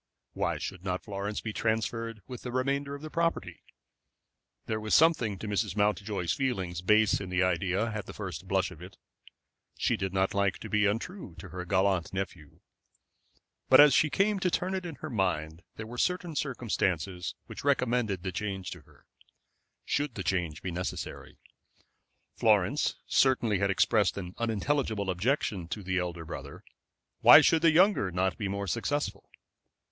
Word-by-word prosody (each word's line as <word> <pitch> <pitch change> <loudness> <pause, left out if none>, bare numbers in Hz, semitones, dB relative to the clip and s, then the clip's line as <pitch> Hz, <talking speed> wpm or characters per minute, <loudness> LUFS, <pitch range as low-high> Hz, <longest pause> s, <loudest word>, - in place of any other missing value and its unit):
Why - - -1
should 95 -2 -6
not 90 -1 -2
Florence 100 0 -4
be 110 - -5
transferred 115 0 -2
with 125 -2 -8
the 125 - -6
remainder 140 +2 -1
of 145 - -11
the 155 - -7
property? 165 0 -1 1.0
There 110 0 -2
was 110 0 +1
something 135 -11 +4
to 110 - -7
Mrs. 105 -1 -1
Mountjoy's 105 -3 0
feelings 95 -11 -2
base 105 +3 +3
in 95 - -6
the 90 0 +2
idea 95 +4 0
at 105 -1 -5
the - - -8
first 95 -2 -6
blush 95 -1 +1
of 85 -3 -12
it. 90 +2 -11 0.8
She - - +1
did 95 -1 -3
not 95 0 +1
like 100 -1 +1
to - - -9
be 105 -1 +3
untrue 115 - -4
to - - -10
her 90 -1 -6
gallant 95 -2 +1
nephew. 90 -6 -6 1.1
But 130 - +8
as 145 -2 +9
she 150 - +4
came 200 +5 +1
to 185 - +1
turn 185 +2 -1
it 185 -2 -3
in 165 - -7
her - - -5
mind 85 -6 -1
there 110 - -6
were 120 +2 -7
certain 180 -3 -1
circumstances 95 - -2
which - - -9
recommended 125 -8 +1
the 95 - -2
change 95 -1 -4
to 90 - -8
her - - -24 0.8
should 145 -4 -1
the 95 - -4
change 85 -3 -2
be 95 - -3
necessary. 90 +2 -5 1.0
Florence 110 +5 +2
certainly 120 -7 +2
had 100 +1 +1
expressed 100 +1 +2
an 90 -2 -6
unintelligible 115 -3 0
objection 100 - -1
to 100 +3 -5
the 95 0 0
elder 85 -2 -4
brother. - - -8 0.6
Why - - +10
should 165 - +3
the 165 - +6
younger 180 - +4
not 90 +1 0
be 105 - -1
more 100 +1 -3
successful? 145 - -2
105 Hz, 170 wpm, -29 LUFS, 95-125 Hz, 1.1 s, Why